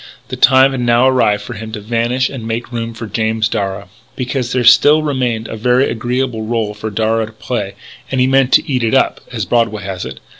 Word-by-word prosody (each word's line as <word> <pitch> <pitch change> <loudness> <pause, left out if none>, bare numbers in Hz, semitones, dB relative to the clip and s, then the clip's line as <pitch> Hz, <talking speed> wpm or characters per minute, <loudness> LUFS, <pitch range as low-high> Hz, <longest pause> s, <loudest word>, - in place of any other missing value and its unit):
The - - -4
time 130 +1 +5
had 135 -2 -3
now 120 +1 +3
arrived 125 -6 +2
for 125 - -7
him 110 0 -8
to 110 - -4
vanish 120 +4 0
and 120 -5 -7
make 115 +2 -4
room 115 -1 -4
for 115 - -6
James 110 +1 -1
Darragh. 100 -3 -3 0.3
Because 125 -1 -3
there 125 -1 0
still 150 +5 +6
remained 125 -6 -1
a - - -6
very 125 +4 +2
agreeable 120 0 -2
rôle 110 -1 -2
for 110 +1 -5
Darragh 110 +1 0
to 110 - -14
play. 105 -3 -4 0.3
And 130 - -1
he 125 - +4
meant 135 0 +2
to - - +4
eat 125 -4 -1
it 115 +3 +1
up 135 - +1
as 110 -5 -3
Broadway 115 -3 0
has 95 -1 -5
it. 65 +1 -8
115 Hz, 220 wpm, -16 LUFS, 110-125 Hz, 0.3 s, still